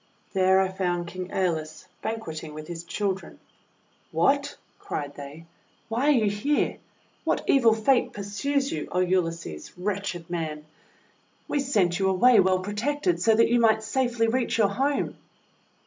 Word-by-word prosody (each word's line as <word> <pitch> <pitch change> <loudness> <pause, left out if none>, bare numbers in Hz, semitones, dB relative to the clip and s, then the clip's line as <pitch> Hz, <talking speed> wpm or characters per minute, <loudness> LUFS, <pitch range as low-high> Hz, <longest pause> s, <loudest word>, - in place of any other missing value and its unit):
There 190 0 +4
I 190 -1 +2
found 180 -2 -1
King 185 +1 -6
^Eolus 165 -5 -2 0.2
banqueting 160 -9 -5
with 155 0 -8
his 170 -1 -6
children. 190 0 -3 0.7
"WTiat!' - - +2 0.2
cried 145 -1 -5
they. 145 +3 -10 0.4
"Why 240 +5 0
are 270 -7 +4
you - - +3
here? 210 +9 0 0.5
What - - 0
evil 235 -5 +5
Fate 240 +4 +2
pursues 270 +8 -2
you, 150 - -3
O - - -2
Ulysses, 170 - -1
wretched 190 -3 -3
man? 155 -3 -4 0.8
We 290 - 0
sent 200 -10 +1
you 190 0 +2
away 225 +5 +5
well 185 -1 +3
protected, 290 - -1
so 225 -1 +4
that 230 +1 +4
you 240 0 +3
might 220 -1 +4
safely 240 -2 0
reach 240 +1 0
your 210 -3 +4
home!' 275 +7 -1
195 Hz, 150 wpm, -26 LUFS, 175-230 Hz, 0.8 s, evil